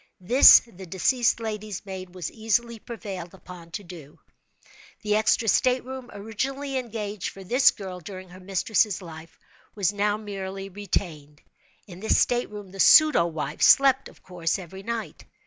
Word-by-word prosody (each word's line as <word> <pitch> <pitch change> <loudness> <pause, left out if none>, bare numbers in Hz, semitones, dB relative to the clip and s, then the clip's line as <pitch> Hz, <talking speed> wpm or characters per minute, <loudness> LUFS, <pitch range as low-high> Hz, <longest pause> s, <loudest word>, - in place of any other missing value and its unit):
This 240 +9 +8
the 190 -5 -13
deceased 230 +8 +1
lady's 215 -3 -6
maid 185 -2 -8
was 180 -3 -5
easily 230 +1 -1
prevailed 190 -6 -8
on 175 -2 -11
to 200 +5 -7
do. 165 -5 -12 0.9
The 210 0 +1
extra 220 +1 +2
state 250 +3 +2
room, 260 -1 -8
originally 265 +7 -4
engaged 215 -6 -4
for 195 - -12
this 250 +8 +4
girl 185 -3 -7
during 185 +1 -10
her 180 +1 -13
mistress' 195 +2 0
life, 165 -3 -12 0.4
was 200 -2 0
now 205 +1 0
merely 195 -2 -7
retained. 170 -7 -5 0.4
In 180 -3 -12
this 220 - +1
state 245 0 +1
room 205 -3 -10
the 195 - -12
pseudo 300 - +6
wife, 155 -2 -5
slept, 270 -1 +5
of - - -21
course, 170 -3 -2
every 190 +1 -10
night. 230 +1 -6
200 Hz, 155 wpm, -25 LUFS, 180-225 Hz, 0.9 s, This